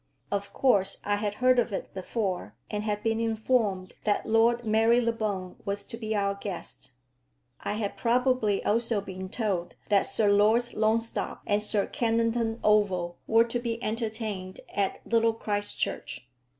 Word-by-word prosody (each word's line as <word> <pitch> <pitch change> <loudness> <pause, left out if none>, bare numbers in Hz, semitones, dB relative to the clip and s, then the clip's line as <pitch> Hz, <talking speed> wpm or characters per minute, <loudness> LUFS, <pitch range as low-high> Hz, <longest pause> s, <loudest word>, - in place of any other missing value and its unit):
Of 200 0 -2
course 200 -7 +2
I 205 0 +1
had 205 0 -2
heard 255 +1 +4
of 240 - +1
it 195 - -5
before, 190 - -3 0.2
and 210 0 -2
had 210 -1 -2
been 225 0 +1
informed 220 -4 0
that 205 -1 +1
Lord 230 +2 +3
Marylebone 220 -4 +1
was 200 0 -2
to - - -8
be 220 -1 -3
our 200 -1 +1
guest. 195 -9 -6 0.7
I - - -3
had 210 -1 -3
probably 240 -4 +2
also 225 0 +1
been 190 -1 -7
told 195 -6 -2
that 200 -2 +3
Sir 215 - +2
Lords 220 +4 +3
Longstop 225 +1 0
and 205 0 +1
Sir 210 -1 0
Kennington 230 0 0
Oval 190 -5 +2
were 225 +1 +5
to 235 +1 -2
be 235 -1 -2
entertained 215 -4 -3
at 195 -1 0
Little 230 -1 +3
Christchurch. 205 - -3
215 Hz, 150 wpm, -28 LUFS, 200-230 Hz, 0.7 s, were